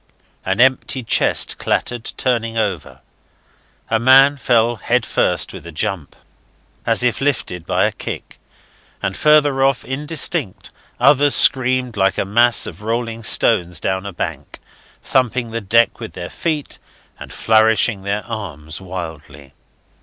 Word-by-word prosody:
An 95 +3 -2
empty 130 0 +2
chest - - +1
clattered 120 -2 -2
turning 115 -3 -1
over; 100 -9 -3 0.9
a 110 - 0
man 135 +4 +6
fell 120 -3 +1
head - - 0
first - - 0
with - - -10
a - - -8
jump, 85 0 -4 0.7
as 115 +1 +2
if 125 +1 0
lifted 90 - -2
by - - +1
a - - 0
kick; - - -8 0.6
and 95 - -2
farther 150 -3 +3
off, 135 -1 +1
indistinct, 150 - -1 0.3
others 140 +2 +4
streamed 130 -3 +2
like 95 0 +1
a - - -1
mass 120 +4 +3
of 90 +4 -9
rolling 115 +1 -3
stones 90 -6 +1
down 95 +3 -3
a - - -6
bank, 85 - -6 0.5
thumping 125 -2 0
the 115 0 -4
deck 115 +4 +2
with 115 -2 -8
their 90 -1 -7
feet 155 -4 -4 0.4
and - - -10
flourishing 110 -1 +2
their 100 +2 -3
arms 80 -9 -6
wildly. 75 -6 -9
115 Hz, 140 wpm, -18 LUFS, 95-130 Hz, 0.9 s, man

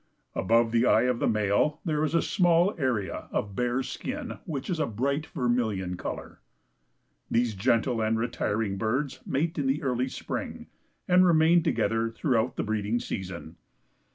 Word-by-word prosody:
Above 115 +3 +2
the 115 0 +3
eye - - +4
of 125 -1 +1
the - - +1
male 110 +8 +1
there 155 -2 0
is 155 +1 0
a 165 - +3
small 175 +1 +3
area 120 - -1
of 100 -1 -2
bare 125 +1 0
skin, - - -5
which 140 -4 -4
is 175 -4 -2
a 155 - +1
bright 140 +7 -1
vermilion 115 - -1
color. - - -6 0.9
These 115 -1 +1
gentle 115 +3 +1
and 110 +1 +1
retiring 110 -3 -1
birds 125 +6 -1
mate 160 +4 -1
in 140 - 0
the 145 +4 0
early 130 -1 0
spring - - -5 0.4
and 180 0 +6
remain 170 0 +5
together 115 -8 0
through 115 0 0
the - - -2
breeding 110 +2 -1
season. 90 -5 -6
125 Hz, 155 wpm, -27 LUFS, 110-150 Hz, 0.9 s, and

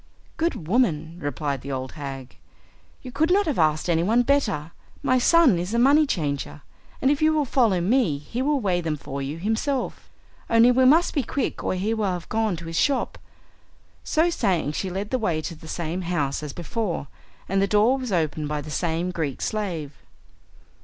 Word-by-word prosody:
"Good 320 - -2
woman," 170 -7 +1
replied 145 -2 -3
the 140 - -6
old 130 -1 -4
hag, 135 -4 -8 0.7
"you 255 - -8
could 315 +6 +1
not 400 +2 +4
have 295 - -1
asked 155 0 +2
anyone 180 +8 +3
better. 210 - 0 0.3
My 255 0 +3
son 280 - +5
is 180 +6 -3
a - - +2
money 285 +5 +5
changer, 145 - -3 0.4
and 270 - +4
if 290 - 0
you 310 0 +5
will 305 -2 +1
follow 230 -8 +2
me 185 - +2
he 225 - -5
will 290 +1 +1
weigh 185 -6 0
them 160 -2 -2
for 140 -1 -6
you 140 +3 -4
himself. 225 - -2 0.4
Only 230 +2 +6
we 260 +1 +4
must 320 +7 +5
be 290 - +1
quick 270 +2 -3
or - - 0
he 200 +5 -1
will 220 -2 -1
have 175 -2 -5
gone 220 -3 0
to 170 0 -9
his 165 0 -2
shop." 280 -2 0 0.8
So 335 +2 +2
saying 185 - 0
she 185 +5 -3
led 195 +3 -4
the 255 - +1
way 175 -8 0
to 155 - -5
the 160 0 -13
same 170 +2 -3
house 155 -6 -1
as 150 -2 -5
before, 175 - -3 0.4
and 195 +1 +1
the 195 - +2
door 215 +6 +3
was 255 -4 -4
opened 155 -4 0
by 150 0 -2
the 150 +1 -9
same 170 +3 -1
Greek 155 -6 -3
slave. 175 -9 -3
185 Hz, 195 wpm, -24 LUFS, 155-250 Hz, 0.8 s, Only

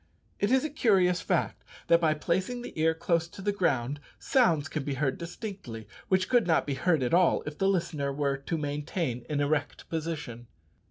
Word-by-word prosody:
It 205 - +1
is 265 +2 +3
a 310 - -3
curious 190 - +3
fact - - -1 0.2
that 170 0 +4
by 155 -2 +3
placing 185 +10 -1
the - - -8
ear 160 +1 +2
close 170 0 0
to 170 - -14
the 205 +1 0
ground 145 -8 0 0.2
sounds 170 - +2
can 155 -2 -3
be 140 0 -3
heard 135 -1 -1
distinctly 170 - -7 0.2
which 185 0 +2
could 245 -6 +3
not 160 - +3
be 145 - -2
heard 160 0 +1
at 125 - -1
all 175 0 +4
if 150 0 -7
the 195 - +2
listener 155 -7 -1
were 140 0 0
to 140 +5 -3
maintain 145 -3 -3
an 145 -1 0
erect 145 0 -1
position. 150 -8 -4
160 Hz, 195 wpm, -29 LUFS, 145-185 Hz, 0.2 s, that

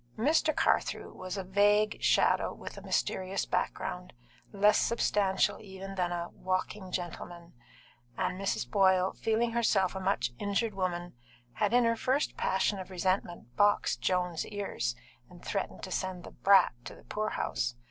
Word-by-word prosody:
Mr. 310 +5 +2
Carthew - - 0
was 185 +2 -6
a 195 - -3
vague 205 +3 +3
shadow - - +2
in - - -6
a - - -9
mysterious 190 +1 -1
background, - - -3 0.4
less 205 +1 +4
substantial 205 -4 +1
even 195 -1 -8
than 180 -2 -1
a 175 0 -3
"walking 185 +1 -3
gentleman," 175 -1 -6 0.6
and 185 +1 -1
Mrs. 195 - -1
Boyle, 190 -2 +3
feeling 225 +1 0
herself 215 -5 +2
a 190 - -4
much 185 -11 0
injured 205 +2 0
woman, 175 -2 -3 0.4
had 210 -1 0
in 245 +1 +5
her 230 0 +3
first 260 +5 0
passion 190 +1 0
of 185 - -7
resentment 180 - -2
boxed 205 +5 +2
Joan's 180 -3 0
ears 195 - -3 0.3
and 175 -1 -15
threatened 195 - -3
to 185 - -6
send 185 -1 -3
the - - -10
"brat" 195 -6 +5
to - - -8
the - - -17
poorhouse. 120 - -2
190 Hz, 150 wpm, -30 LUFS, 180-205 Hz, 0.6 s, in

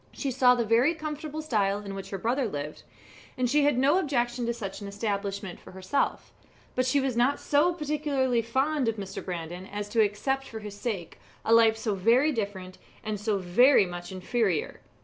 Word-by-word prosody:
She 275 - -3
saw 250 0 +5
the 235 -2 0
very 240 +9 +3
comfortable 310 0 -5
style 205 -8 +1
in 200 - -5
which 195 0 -7
her 195 - -4
brother 240 +6 0
lived, 150 -4 -5 0.6
and 255 -1 +1
she 285 +3 +3
had 290 -3 +3
no 280 +8 +4
objection 245 -6 -1
to - - +1
such 200 -3 -6
an 200 - -6
establishment 200 -2 -3
for - - -14
herself; 190 +9 -2 0.4
but 255 0 0
she 280 +2 +3
was 265 -3 -1
not 245 +4 +2
so 300 +5 +3
particularly 290 -6 0
fond 265 +4 0
of 225 - +1
Mr. 195 -3 -6
Brandon 175 +1 -6
as 205 0 -5
to 225 +1 +3
accept 265 +6 0
for 225 - -8
his 210 -1 -8
sake 205 -6 -5 0.3
a 225 - +3
life 225 -1 +6
so 220 -1 -1
very 235 +10 +3
different 200 -6 -4 0.2
and 215 -1 -3
so 210 0 0
very 195 +6 +5
much 175 0 -7
inferior. 190 -2 -1
230 Hz, 190 wpm, -27 LUFS, 200-270 Hz, 0.6 s, life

